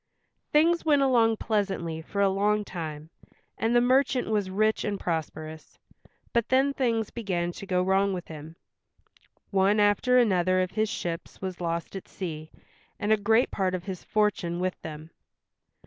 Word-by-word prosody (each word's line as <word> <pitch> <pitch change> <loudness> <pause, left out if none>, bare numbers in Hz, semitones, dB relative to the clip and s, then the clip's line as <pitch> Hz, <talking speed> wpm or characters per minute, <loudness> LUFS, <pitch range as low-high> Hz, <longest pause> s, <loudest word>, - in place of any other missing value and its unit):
Things 335 +3 +3
went 290 -3 +3
along 230 -4 +3
pleasantly 190 -8 -2
for 200 +5 -3
a 200 - +5
long 205 +2 +1
time, 160 -3 -7 0.4
and 225 +2 0
the 240 - +6
merchant 255 +1 +2
was 205 -3 0
rich 215 +3 +1
and 205 -2 -2
prosperous, 160 -1 -5 0.6
but 235 -1 +1
then 270 +2 +3
things 230 -5 0
began 180 -7 -2
to 195 - -10
go 180 -1 +1
wrong 195 +1 +2
with 180 -2 -5
him. 155 +1 -9 1.0
One 200 +2 +3
after 210 +5 +3
another 185 -6 +3
of 185 -1 0
his 215 +1 0
ships 170 -5 -5
was 185 -2 -5
lost 170 +2 -3
at 195 - -7
sea, 160 -4 -6 0.5
and 210 0 -1
a - - +6
great 220 +4 +2
part 185 -2 0
of 180 - -5
his 190 -2 -6
fortune 200 -5 0
with 185 0 -2
them. 155 +1 -8
195 Hz, 165 wpm, -27 LUFS, 175-220 Hz, 1.0 s, the